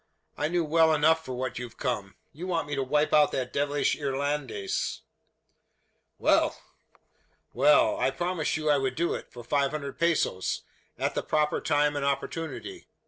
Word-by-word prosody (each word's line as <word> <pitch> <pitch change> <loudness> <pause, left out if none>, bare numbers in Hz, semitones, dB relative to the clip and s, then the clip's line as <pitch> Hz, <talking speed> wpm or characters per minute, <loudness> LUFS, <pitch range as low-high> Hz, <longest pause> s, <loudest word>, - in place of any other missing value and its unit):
I 150 - 0
know 175 +1 +1
well 160 0 +4
enough 160 +2 +3
for 130 - -6
what 130 0 -3
you've 125 -2 -8
come. 105 -7 -3 0.2
You 175 +5 -7
want 165 -5 -1
me 145 - -4
to 140 - 0
wipe 150 +3 +1
out 150 -1 +5
that 125 -1 -2
devilish 145 0 +1
Irlandes!" 140 -7 -2 1.2
"Well!" - - +2 0.9
"Well; 145 +4 +4
I - - +2
promised 170 +3 -1
you 155 -1 -3
I 145 -2 +4
would 130 -1 -1
do 170 +3 0
it, - - -7
for 120 - -10
five 140 +3 +1
hundred 140 -2 -6
pesos 165 - 0 0.3
at - - -1
the - - -1
proper 150 -1 0
time 150 -1 +2
and 145 - -2
opportunity. 165 - -3
145 Hz, 165 wpm, -28 LUFS, 135-160 Hz, 1.2 s, out